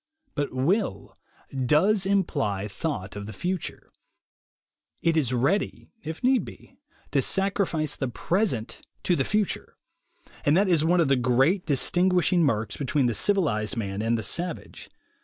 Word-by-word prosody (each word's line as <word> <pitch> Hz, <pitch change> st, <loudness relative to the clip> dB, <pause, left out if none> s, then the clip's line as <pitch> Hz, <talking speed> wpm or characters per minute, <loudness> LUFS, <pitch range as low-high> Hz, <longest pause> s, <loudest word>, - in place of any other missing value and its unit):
But 145 Hz, -1 st, -2 dB
will 170 Hz, -, -1 dB, 0.4 s
does 175 Hz, -, +2 dB
imply 140 Hz, -, 0 dB
thought 100 Hz, -, -4 dB
of 105 Hz, 0 st, -6 dB
the 110 Hz, -, -7 dB
future. 180 Hz, -, -4 dB, 1.1 s
It 165 Hz, -1 st, +3 dB
is 140 Hz, -6 st, +1 dB
ready, 135 Hz, -, 0 dB
if 160 Hz, +5 st, -7 dB
need 255 Hz, 0 st, +3 dB
be, -, -, -13 dB, 0.3 s
to -, -, +3 dB
sacrifice 190 Hz, -6 st, 0 dB
the 135 Hz, -, -2 dB
present 130 Hz, -, -1 dB, 0.2 s
to 180 Hz, -, +2 dB
the 135 Hz, -, +1 dB
future. 210 Hz, +4 st, -2 dB, 0.7 s
And 145 Hz, +3 st, +4 dB
that 200 Hz, +1 st, +3 dB
is 170 Hz, -4 st, +3 dB
one 175 Hz, +2 st, +3 dB
of 160 Hz, -, +2 dB
the 135 Hz, -, +4 dB
great 130 Hz, +9 st, +2 dB
dis 140 Hz, -4 st, +1 dB
tinguishing 180 Hz, -1 st, +3 dB
marks 115 Hz, -10 st, 0 dB
between 140 Hz, -1 st, 0 dB
the 120 Hz, -, +1 dB
civilized 125 Hz, -, 0 dB
man 100 Hz, -2 st, -3 dB
and 115 Hz, +1 st, +1 dB
the 110 Hz, -, -4 dB
savage. 175 Hz, +7 st, -4 dB
150 Hz, 150 wpm, -26 LUFS, 120-185 Hz, 1.1 s, And